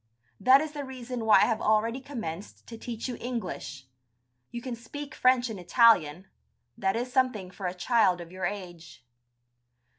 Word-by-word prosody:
That 260 Hz, +3 st, +6 dB
is 310 Hz, -1 st, -4 dB
the 295 Hz, -1 st, -5 dB
reason 250 Hz, -3 st, -6 dB
why 220 Hz, -, +6 dB
I -, -, +6 dB
have 220 Hz, -, -1 dB
already 225 Hz, +4 st, +1 dB
commenced 215 Hz, -, -7 dB
to 230 Hz, -, -9 dB
teach 230 Hz, +1 st, -6 dB
you 245 Hz, -2 st, -5 dB
English. 230 Hz, -, -5 dB, 0.6 s
You 240 Hz, -, -6 dB
can 245 Hz, 0 st, -5 dB
speak 275 Hz, +5 st, -8 dB
French 255 Hz, -1 st, +3 dB
and 220 Hz, -4 st, -6 dB
Italian, 180 Hz, -4 st, +4 dB, 0.5 s
that 195 Hz, +1 st, 0 dB
is 245 Hz, +2 st, -3 dB
something 250 Hz, -9 st, 0 dB
for 190 Hz, 0 st, -5 dB
a 180 Hz, -, -4 dB
child 195 Hz, -2 st, +2 dB
of 170 Hz, -1 st, -9 dB
your 185 Hz, 0 st, -4 dB
age." 175 Hz, -8 st, -9 dB
230 Hz, 170 wpm, -28 LUFS, 185-255 Hz, 0.6 s, That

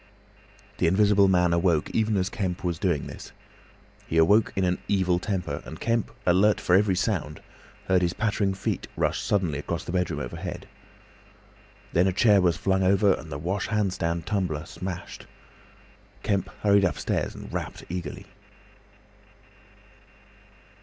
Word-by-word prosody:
The -, -, +3 dB
Invisible 100 Hz, +2 st, +4 dB
Man 90 Hz, -2 st, +3 dB
awoke 85 Hz, -3 st, +1 dB
even 110 Hz, -2 st, +1 dB
as 90 Hz, -1 st, +1 dB
Kemp 95 Hz, -3 st, -3 dB
was 85 Hz, -2 st, -2 dB
doing 85 Hz, -7 st, 0 dB
this. -, -, -9 dB, 0.8 s
He 80 Hz, -, -1 dB
awoke 100 Hz, +7 st, +4 dB
in 95 Hz, -, 0 dB
an 90 Hz, 0 st, +1 dB
evil 95 Hz, -3 st, +2 dB
temper, 90 Hz, -7 st, -3 dB
and 80 Hz, -, -9 dB
Kemp, 115 Hz, -1 st, 0 dB, 0.2 s
alert 95 Hz, +4 st, +4 dB
for 90 Hz, -, 0 dB
every 100 Hz, -1 st, +3 dB
sound, 90 Hz, -6 st, -2 dB, 0.5 s
heard 95 Hz, -1 st, +3 dB
his 90 Hz, -1 st, +1 dB
pattering 105 Hz, -3 st, 0 dB
feet 95 Hz, -, -3 dB
rush -, -, 0 dB
suddenly 90 Hz, -8 st, 0 dB
across 85 Hz, +3 st, -4 dB
the -, -, -6 dB
bedroom 90 Hz, -5 st, -1 dB
overhead. 60 Hz, -4 st, -6 dB, 1.3 s
Then 90 Hz, +3 st, +4 dB
a -, -, +2 dB
chair 105 Hz, 0 st, +5 dB
was 90 Hz, -2 st, +2 dB
flung 95 Hz, 0 st, +1 dB
over 100 Hz, +1 st, +4 dB
and 80 Hz, -3 st, -7 dB
the 70 Hz, -, -3 dB
wash 95 Hz, +7 st, -2 dB
hand 105 Hz, -4 st, 0 dB
stand 85 Hz, -1 st, -2 dB
tumbler 90 Hz, -6 st, -2 dB
smashed. 90 Hz, -1 st, -7 dB, 1.0 s
Kemp 100 Hz, -2 st, 0 dB
hurried 100 Hz, -1 st, +5 dB
upstairs 90 Hz, -, -1 dB
and -, -, -10 dB
rapped -, -, -5 dB
eagerly. 90 Hz, 0 st, -6 dB
95 Hz, 145 wpm, -26 LUFS, 85-100 Hz, 1.3 s, chair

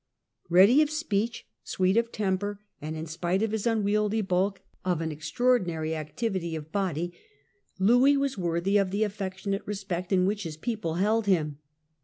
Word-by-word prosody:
Eeady 195 Hz, -, +7 dB
of 305 Hz, -, +2 dB
speech, 235 Hz, -8 st, -2 dB, 0.2 s
sweet 185 Hz, +1 st, +1 dB
of 230 Hz, 0 st, +2 dB
temper, 205 Hz, 0 st, -1 dB, 0.2 s
and, 155 Hz, +2 st, -4 dB
in 160 Hz, -, -4 dB
spite 175 Hz, +5 st, -1 dB
of 220 Hz, -, 0 dB
his 220 Hz, 0 st, -1 dB
unwieldy 210 Hz, -1 st, +1 dB
bulk, 190 Hz, 0 st, 0 dB, 0.2 s
of 180 Hz, -3 st, 0 dB
an 160 Hz, -1 st, -2 dB
extraordinary 160 Hz, 0 st, 0 dB
activity 170 Hz, +2 st, -3 dB
of 155 Hz, 0 st, -7 dB
body, 175 Hz, -4 st, -1 dB, 0.6 s
Louis 245 Hz, +8 st, +5 dB
was 275 Hz, -1 st, 0 dB
worthy 175 Hz, +1 st, +1 dB
of 195 Hz, -2 st, +2 dB
the 200 Hz, +3 st, 0 dB
affectionate 195 Hz, -1 st, -3 dB
respect 195 Hz, -3 st, -4 dB
in 185 Hz, -1 st, +4 dB
which 205 Hz, +2 st, 0 dB
his 160 Hz, -5 st, -6 dB
people 200 Hz, -3 st, -3 dB
held 210 Hz, +4 st, +1 dB
him. 155 Hz, -6 st, +1 dB
195 Hz, 160 wpm, -27 LUFS, 170-215 Hz, 0.6 s, Eeady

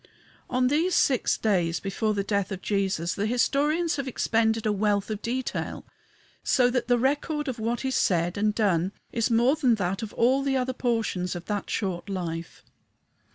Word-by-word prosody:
On 255 Hz, 0 st, +1 dB
these 320 Hz, +7 st, +2 dB
six 260 Hz, -4 st, +2 dB
days 175 Hz, -6 st, +1 dB
before 210 Hz, +2 st, -1 dB
the 200 Hz, -, 0 dB
death 200 Hz, -1 st, -1 dB
of 190 Hz, -1 st, -5 dB
Jesus 190 Hz, -4 st, 0 dB
the 205 Hz, +1 st, -1 dB
historians 295 Hz, +8 st, +1 dB
have 275 Hz, -1 st, -3 dB
expended 225 Hz, -2 st, +1 dB
a 215 Hz, -, +2 dB
wealth 205 Hz, 0 st, 0 dB
of 210 Hz, 0 st, -4 dB
detail, 255 Hz, +2 st, -3 dB, 0.6 s
so 250 Hz, -1 st, +3 dB
that 245 Hz, -1 st, -1 dB
the 245 Hz, -1 st, +4 dB
record 290 Hz, +4 st, 0 dB
of 255 Hz, -3 st, -3 dB
what 235 Hz, +4 st, -2 dB
is 265 Hz, -, 0 dB
said 175 Hz, -4 st, +1 dB
and 210 Hz, +1 st, +1 dB
done 190 Hz, -3 st, +1 dB, 0.2 s
is 230 Hz, 0 st, 0 dB
more 240 Hz, +5 st, +4 dB
than 260 Hz, -7 st, +3 dB
that 190 Hz, -2 st, -2 dB
of 220 Hz, -2 st, -5 dB
all 255 Hz, +4 st, +3 dB
the 275 Hz, -1 st, +1 dB
other 255 Hz, 0 st, -1 dB
portions 225 Hz, -8 st, -1 dB
of 175 Hz, 0 st, -7 dB
that 205 Hz, -2 st, -3 dB
short 190 Hz, -2 st, -2 dB
life. 170 Hz, -3 st, -5 dB
220 Hz, 180 wpm, -26 LUFS, 195-255 Hz, 0.6 s, the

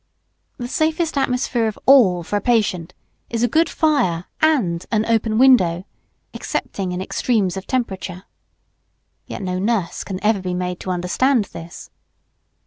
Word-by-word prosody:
The 245 Hz, -3 st, -5 dB
safest 315 Hz, +4 st, 0 dB
atmosphere 250 Hz, -3 st, 0 dB
of 215 Hz, -, -4 dB
all 205 Hz, -11 st, +5 dB
for 190 Hz, -, -4 dB
a 205 Hz, -, 0 dB
patient 195 Hz, -8 st, 0 dB, 0.3 s
is 230 Hz, 0 st, -1 dB
a -, -, +4 dB
good 320 Hz, +8 st, +2 dB
fire 245 Hz, -, +1 dB, 0.2 s
and 225 Hz, -, +2 dB
an 215 Hz, -1 st, +1 dB
open 225 Hz, -1 st, +1 dB
window, 190 Hz, -9 st, +4 dB, 0.5 s
excepting 190 Hz, -2 st, -4 dB
in 180 Hz, -, -3 dB
extremes 195 Hz, -1 st, 0 dB
of 190 Hz, -, -7 dB
temperature. 190 Hz, -7 st, -3 dB, 1.0 s
(Yet -, -, -6 dB
no 185 Hz, -1 st, -2 dB
nurse 205 Hz, -3 st, -1 dB
can 190 Hz, -, -5 dB
ever 210 Hz, -1 st, +2 dB
be 180 Hz, -1 st, -3 dB
made 180 Hz, 0 st, -3 dB
to -, -, -7 dB
understand 200 Hz, +7 st, +1 dB
this.) 165 Hz, 0 st, -10 dB
210 Hz, 145 wpm, -20 LUFS, 180-250 Hz, 1.0 s, all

